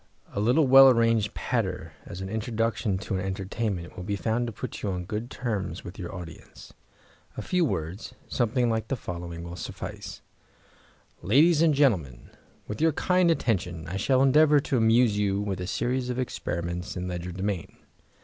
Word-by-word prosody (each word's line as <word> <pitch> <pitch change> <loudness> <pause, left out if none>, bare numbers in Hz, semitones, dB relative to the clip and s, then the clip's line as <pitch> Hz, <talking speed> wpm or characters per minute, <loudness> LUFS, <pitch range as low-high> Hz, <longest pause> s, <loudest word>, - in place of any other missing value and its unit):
A - - -2
little 125 +9 +3
well 135 +1 +9
arranged 115 -3 +2
patter 95 -9 -2
as 90 - -7
an 95 - -4
introductory 110 -2 -1
to 100 +2 -5
an - - -2
entertainment 95 -1 -3
will 90 - -7
be 100 +3 -2
found 115 +4 -1
to - - -4
put - - -7
you 105 - -2
on 90 -2 -3
good 110 +5 -4
terms 105 -10 -3
with 95 +4 -9
your 85 - -5
audience. 85 -4 -10 0.6
A - - -4
few 180 -1 +1
words, 95 - -3
something 120 0 +1
like 110 -1 -1
the 135 - -1
following, 85 -5 -6
will 85 0 -7
suffice: - - -7 1.0
"Ladies 150 - +4
and 160 -3 +4
Gentlemen, 90 - +1 0.4
with 105 +4 -5
your 160 -1 +4
kind 180 +2 +2
attention 90 - 0
I 95 +4 -3
shall 130 +6 +3
endeavour 150 +2 +5
to 135 - -1
amuse 115 -1 +4
you 100 -1 +1
with 100 -3 -3
a 90 - -4
series 125 +5 -1
of 125 - -2
experiments 90 -8 -3
in 90 0 -3
legerdemain. 90 +1 -4
105 Hz, 170 wpm, -27 LUFS, 90-125 Hz, 1.0 s, well